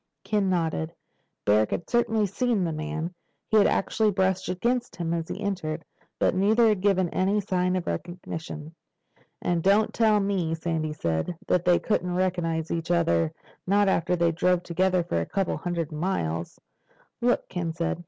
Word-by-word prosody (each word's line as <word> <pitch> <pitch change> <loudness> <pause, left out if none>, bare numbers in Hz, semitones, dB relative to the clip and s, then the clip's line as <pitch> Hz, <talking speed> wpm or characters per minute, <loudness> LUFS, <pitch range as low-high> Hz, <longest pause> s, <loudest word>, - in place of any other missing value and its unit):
Ken 205 -3 +1
nodded. 165 -2 -1 0.5
Barrack 105 +1 +4
had 170 - -3
certainly 225 -3 +2
seen 220 +1 0
the 165 -2 -1
man. 155 +3 -4 0.4
He 220 - +4
had 205 - +6
actually 215 +2 +1
brushed 190 -1 0
against 235 +7 -1
him 170 -1 -2
as 165 -1 -3
he - - -4
entered. 170 -7 -3 0.3
But - - +2
neither 220 +5 +4
had 210 -3 +1
given 190 -2 +3
any 195 +5 +1
sign 185 -2 0
of 185 - -2
recognition. 160 - -5 0.7
"And 175 -1 +1
don't 200 +4 +3
tell 220 -2 +4
me," 190 -5 0
Sandy 160 -2 -2
said, 85 - -2
"that 180 0 +1
they 175 -1 +5
couldn't 180 -4 -1
recognize 170 -3 0
each 165 0 -2
other—not 170 - +1
after 180 -2 +2
they 170 -1 +2
drove 180 +1 +1
together 180 +1 +1
for 85 - -1
a - - -2
couple 195 -2 -1
of - - -5
hundred 170 -3 -2
miles." 85 - -2 0.6
"Look," 245 +1 +2
Ken 170 -2 -3
said. 170 +1 -2
180 Hz, 165 wpm, -26 LUFS, 165-195 Hz, 0.7 s, had